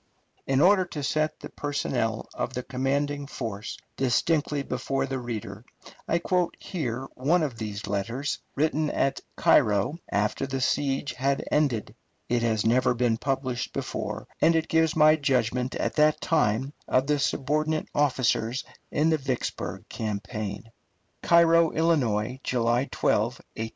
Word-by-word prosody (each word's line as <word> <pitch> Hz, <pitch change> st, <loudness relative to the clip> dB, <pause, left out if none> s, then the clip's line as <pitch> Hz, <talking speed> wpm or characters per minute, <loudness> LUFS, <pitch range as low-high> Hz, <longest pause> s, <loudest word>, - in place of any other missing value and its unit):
In 135 Hz, 0 st, +3 dB
order 190 Hz, +2 st, +6 dB
to 150 Hz, -4 st, -6 dB
set 155 Hz, +3 st, 0 dB
the -, -, -7 dB
personnel 125 Hz, -6 st, -2 dB
of 130 Hz, -, -3 dB
the 125 Hz, -, -3 dB
commanding 140 Hz, +2 st, -1 dB
force 110 Hz, -6 st, -5 dB, 0.2 s
distinctly 145 Hz, +3 st, +1 dB
before 135 Hz, +1 st, -2 dB
the 135 Hz, -1 st, -3 dB
reader, 110 Hz, -3 st, -6 dB, 0.4 s
I 170 Hz, -, +2 dB
quote 180 Hz, 0 st, 0 dB
here 135 Hz, -, -3 dB
one 155 Hz, +7 st, +2 dB
of 130 Hz, -6 st, -3 dB
these 105 Hz, -2 st, -4 dB
letters, 115 Hz, +8 st, -2 dB, 0.2 s
written 155 Hz, +1 st, +1 dB
at 135 Hz, -1 st, 0 dB
Cairo 105 Hz, -, +3 dB
after 105 Hz, +6 st, 0 dB
the 135 Hz, 0 st, -2 dB
siege 135 Hz, +2 st, 0 dB
had 135 Hz, +2 st, 0 dB
ended. 140 Hz, -8 st, +1 dB, 0.4 s
It 120 Hz, -1 st, +2 dB
has 110 Hz, -2 st, +1 dB
never 125 Hz, +2 st, +3 dB
been 120 Hz, -2 st, +1 dB
published 130 Hz, -1 st, -2 dB
before, -, -, -4 dB
and 165 Hz, -, +5 dB
it 160 Hz, 0 st, 0 dB
gives 160 Hz, 0 st, +3 dB
my 155 Hz, 0 st, +6 dB
judgment 125 Hz, -3 st, 0 dB
at -, -, -2 dB
that 150 Hz, 0 st, +4 dB
time 135 Hz, -4 st, +1 dB
of 130 Hz, +1 st, +2 dB
the 150 Hz, 0 st, +1 dB
subordinate 155 Hz, +3 st, 0 dB
officers 130 Hz, -3 st, +1 dB, 0.3 s
in 155 Hz, +2 st, +2 dB
the 160 Hz, -, +2 dB
Vicksburg 130 Hz, -3 st, -3 dB
campaign: 105 Hz, 0 st, -5 dB, 0.5 s
CAIRO, 170 Hz, -1 st, +5 dB
ILL., 125 Hz, -8 st, +1 dB
July 120 Hz, +1 st, +1 dB
12, 105 Hz, -, +2 dB
1863. 115 Hz, -1 st, -6 dB
135 Hz, 140 wpm, -27 LUFS, 115-150 Hz, 0.5 s, order